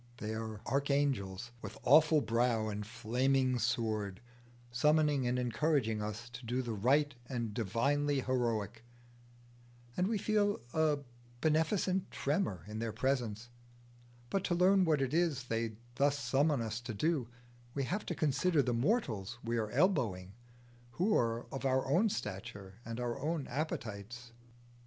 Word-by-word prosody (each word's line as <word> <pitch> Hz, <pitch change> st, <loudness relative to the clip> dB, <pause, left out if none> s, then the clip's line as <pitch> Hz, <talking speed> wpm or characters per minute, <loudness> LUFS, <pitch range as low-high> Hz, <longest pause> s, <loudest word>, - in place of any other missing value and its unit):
They 110 Hz, -1 st, -4 dB
are 110 Hz, -1 st, -5 dB
archangels 135 Hz, -7 st, 0 dB
with 110 Hz, 0 st, -7 dB
awful 155 Hz, +1 st, +6 dB
brow 115 Hz, -2 st, +1 dB
and 105 Hz, 0 st, -3 dB
flaming 125 Hz, +3 st, +1 dB
sword, 110 Hz, -4 st, -1 dB, 0.5 s
summoning 150 Hz, 0 st, +3 dB
and 125 Hz, +1 st, +1 dB
encouraging 125 Hz, -3 st, +1 dB
us 105 Hz, +3 st, -5 dB
to 120 Hz, +1 st, -10 dB
do 125 Hz, +3 st, -1 dB
the 120 Hz, -2 st, -3 dB
right 140 Hz, +8 st, +2 dB, 0.2 s
and 120 Hz, -4 st, -2 dB
the 110 Hz, +2 st, -2 dB
divinely 140 Hz, +7 st, +1 dB
heroic, 120 Hz, -3 st, -1 dB, 1.1 s
and 180 Hz, -, +1 dB
we 220 Hz, 0 st, 0 dB
feel 205 Hz, 0 st, +1 dB
a 155 Hz, -2 st, +3 dB, 0.4 s
beneficent 170 Hz, -, +1 dB
tremor 140 Hz, -, -1 dB
in 105 Hz, +1 st, -5 dB
their 115 Hz, -1 st, -2 dB
presence; 120 Hz, -2 st, -1 dB, 0.8 s
but 195 Hz, -1 st, 0 dB
to 175 Hz, -, +1 dB
learn 185 Hz, +2 st, +5 dB
what 150 Hz, -4 st, +2 dB
it 135 Hz, +1 st, -2 dB
is 160 Hz, -5 st, +1 dB
they 115 Hz, -2 st, -2 dB, 0.2 s
thus 140 Hz, +3 st, +2 dB
summon 140 Hz, +1 st, +1 dB
us 110 Hz, +1 st, -4 dB
to 120 Hz, -2 st, -6 dB
do, 145 Hz, +1 st, 0 dB, 0.5 s
we 140 Hz, -, 0 dB
have 185 Hz, +10 st, -2 dB
to 175 Hz, -, -2 dB
consider 155 Hz, +1 st, +2 dB
the 125 Hz, -1 st, 0 dB
mortals 120 Hz, -, 0 dB
we 115 Hz, +1 st, -1 dB
are 110 Hz, -1 st, -2 dB
elbowing, 120 Hz, -, +1 dB, 0.6 s
who 200 Hz, -, +2 dB
are 115 Hz, 0 st, +1 dB
of 135 Hz, -, -5 dB
our 130 Hz, -1 st, +2 dB
own 180 Hz, +11 st, +3 dB
stature 100 Hz, -, -6 dB
and 115 Hz, +1 st, -5 dB
our 120 Hz, -1 st, -2 dB
own 155 Hz, -1 st, -1 dB
appetites. 120 Hz, -4 st, -4 dB
125 Hz, 145 wpm, -33 LUFS, 115-150 Hz, 1.1 s, awful